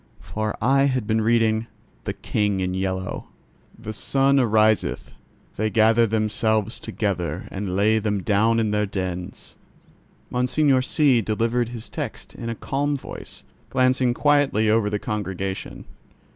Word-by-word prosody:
For 110 Hz, -1 st, -4 dB
I 135 Hz, +3 st, +4 dB
had 130 Hz, -5 st, 0 dB
been 110 Hz, +1 st, +1 dB
reading 115 Hz, 0 st, +2 dB, 0.4 s
The -, -, -2 dB
King 105 Hz, -2 st, -1 dB
in 90 Hz, 0 st, -1 dB
Yellow. 95 Hz, 0 st, -3 dB, 0.5 s
"The 110 Hz, -1 st, -7 dB
sun 135 Hz, +5 st, +2 dB
ariseth; 110 Hz, -3 st, +2 dB, 0.4 s
they 110 Hz, +1 st, 0 dB
gather 115 Hz, +2 st, +4 dB
themselves 110 Hz, 0 st, 0 dB
together 90 Hz, -5 st, -3 dB
and 95 Hz, -2 st, -3 dB
lay 110 Hz, +3 st, +3 dB
them 105 Hz, -3 st, -1 dB
down 110 Hz, +2 st, +2 dB
in 110 Hz, -2 st, 0 dB
their 105 Hz, 0 st, +1 dB
dens." 90 Hz, -2 st, -5 dB, 0.8 s
Monseigneur 130 Hz, +2 st, +2 dB
C—— 135 Hz, -2 st, +3 dB
delivered 115 Hz, +3 st, 0 dB
his 115 Hz, -2 st, -7 dB
text -, -, -6 dB
in 115 Hz, -, -6 dB
a 115 Hz, -, -3 dB
calm 145 Hz, +4 st, -1 dB
voice, -, -, -10 dB, 0.3 s
glancing 130 Hz, -1 st, +2 dB
quietly 145 Hz, -8 st, +3 dB
over 110 Hz, -2 st, +2 dB
the 105 Hz, -, -1 dB
congregation. 95 Hz, -3 st, -4 dB
110 Hz, 135 wpm, -23 LUFS, 105-125 Hz, 0.8 s, I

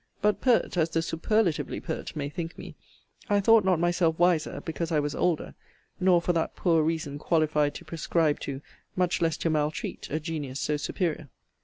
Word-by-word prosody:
But 210 Hz, 0 st, +1 dB
pert 240 Hz, -7 st, +2 dB
as 165 Hz, -1 st, +2 dB
the 165 Hz, 0 st, 0 dB
superlatively 175 Hz, +2 st, 0 dB
pert 160 Hz, -, -5 dB
may 145 Hz, -2 st, -2 dB
think 165 Hz, +2 st, -6 dB
me, -, -, -9 dB, 0.6 s
I 205 Hz, 0 st, +4 dB
thought 225 Hz, +2 st, +5 dB
not 185 Hz, -3 st, +2 dB
myself 175 Hz, -1 st, +2 dB
wiser, 175 Hz, -2 st, +2 dB
because 165 Hz, +1 st, -3 dB
I 155 Hz, -, +3 dB
was 145 Hz, 0 st, -2 dB
older; 170 Hz, -1 st, 0 dB, 0.5 s
nor 180 Hz, -1 st, +5 dB
for 175 Hz, -, +1 dB
that 165 Hz, -1 st, -1 dB
poor 165 Hz, -3 st, +3 dB
reason 155 Hz, -2 st, -2 dB
qualified 150 Hz, -2 st, +1 dB
to 175 Hz, -, -9 dB
prescribe 160 Hz, -1 st, 0 dB
to, 135 Hz, 0 st, -5 dB, 0.3 s
much 180 Hz, -1 st, +1 dB
less 165 Hz, -1 st, +1 dB
to 165 Hz, -, 0 dB
maltreat, 150 Hz, 0 st, -2 dB
a 155 Hz, -, -1 dB
genius 150 Hz, -5 st, -4 dB
so 150 Hz, -, 0 dB
superior. 155 Hz, -1 st, -2 dB
165 Hz, 180 wpm, -27 LUFS, 155-175 Hz, 0.6 s, thought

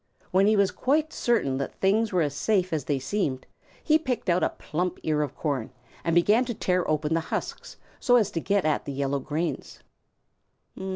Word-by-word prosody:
When 190 Hz, +2 st, +4 dB
he 215 Hz, -, +4 dB
was 200 Hz, -2 st, +3 dB
quite 305 Hz, +4 st, 0 dB
certain 140 Hz, -, +1 dB
that 140 Hz, -, -4 dB
things 210 Hz, +3 st, +2 dB
were 180 Hz, -3 st, +2 dB
as 145 Hz, -2 st, -2 dB
safe 185 Hz, +2 st, 0 dB
as 150 Hz, -4 st, -1 dB
they 145 Hz, -, 0 dB
seemed, 135 Hz, -2 st, -2 dB, 0.4 s
he 310 Hz, 0 st, +4 dB
picked 260 Hz, -10 st, -2 dB
out 175 Hz, +1 st, +2 dB
a -, -, +2 dB
plump 180 Hz, +3 st, -3 dB
ear 150 Hz, -1 st, +1 dB
of 145 Hz, -2 st, -3 dB
corn 140 Hz, -7 st, -2 dB, 0.3 s
and 165 Hz, -1 st, 0 dB
began 210 Hz, +8 st, +4 dB
to 240 Hz, -2 st, -4 dB
tear 180 Hz, -2 st, 0 dB
open 155 Hz, 0 st, 0 dB
the 165 Hz, -, +2 dB
husks, -, -, -5 dB, 0.2 s
so 245 Hz, -, +4 dB
as 215 Hz, -4 st, +3 dB
to 170 Hz, -, -2 dB
get 200 Hz, +2 st, 0 dB
at 155 Hz, -1 st, 0 dB
the 140 Hz, -, -4 dB
yellow 140 Hz, 0 st, -1 dB
grains. 155 Hz, +5 st, -4 dB
175 Hz, 195 wpm, -26 LUFS, 150-210 Hz, 0.4 s, When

